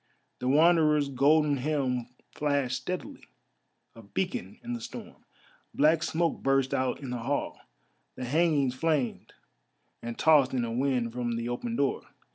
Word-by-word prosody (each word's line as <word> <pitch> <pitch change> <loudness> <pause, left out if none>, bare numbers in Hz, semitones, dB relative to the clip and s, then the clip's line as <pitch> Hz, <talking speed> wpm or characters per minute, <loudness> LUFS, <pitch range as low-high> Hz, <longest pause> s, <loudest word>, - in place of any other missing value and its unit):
The 125 - -3
Wanderer's 150 0 +4
golden 145 +2 +3
helm 130 -3 -1 0.3
flashed 140 -4 0
steadily, 180 0 -6 0.7
a 115 - -13
beacon 190 - -4
in 240 0 -4
the 240 - -5
storm. - - -9 0.5
Black 155 +2 +4
smoke 170 0 -1
burst 135 -1 +1
out 130 0 0
in 135 -3 -6
the 125 - -3
hall, 135 +5 -2 0.6
the 125 - -5
hangings 145 -2 +2
flamed 145 -2 -1 0.7
and 115 0 -6
tossed 145 -5 +4
in 120 -2 0
a 115 - -4
wind 125 -2 0
from 120 -1 -2
the 115 0 -3
open 230 - -3
door. 140 -8 0
140 Hz, 145 wpm, -28 LUFS, 125-155 Hz, 0.7 s, Wanderer's